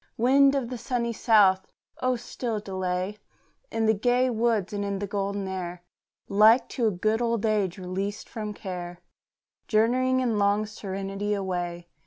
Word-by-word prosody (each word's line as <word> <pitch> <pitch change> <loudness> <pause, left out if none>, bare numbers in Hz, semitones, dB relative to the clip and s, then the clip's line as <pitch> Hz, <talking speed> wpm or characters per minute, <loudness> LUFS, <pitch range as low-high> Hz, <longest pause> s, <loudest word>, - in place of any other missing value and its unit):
Wind 275 +4 +5
of 260 -4 -1
the 250 -2 -5
sunny 235 -1 -1
south! 200 -5 +4 0.3
oh 255 0 +2
still 235 -2 -4
delay 190 0 -3 0.5
In 225 - -1
the 220 - +4
gay 245 +4 +2
woods 225 -3 0
and 205 0 -2
in 200 -1 -2
the 205 - -3
golden 200 0 -2
air, 180 -2 -5 0.4
Like 215 +5 +5
to 235 -3 0
a - - +2
good 215 +5 0
old 230 -2 0
age 205 -4 +1
released 190 +2 -4
from 215 -2 -5
care, 180 -3 -6 0.7
Journeying, 255 +4 +2
in 235 -5 0
long 205 +1 +2
serenity, 195 0 -4
away. 175 -3 -3
210 Hz, 155 wpm, -26 LUFS, 190-235 Hz, 0.7 s, Wind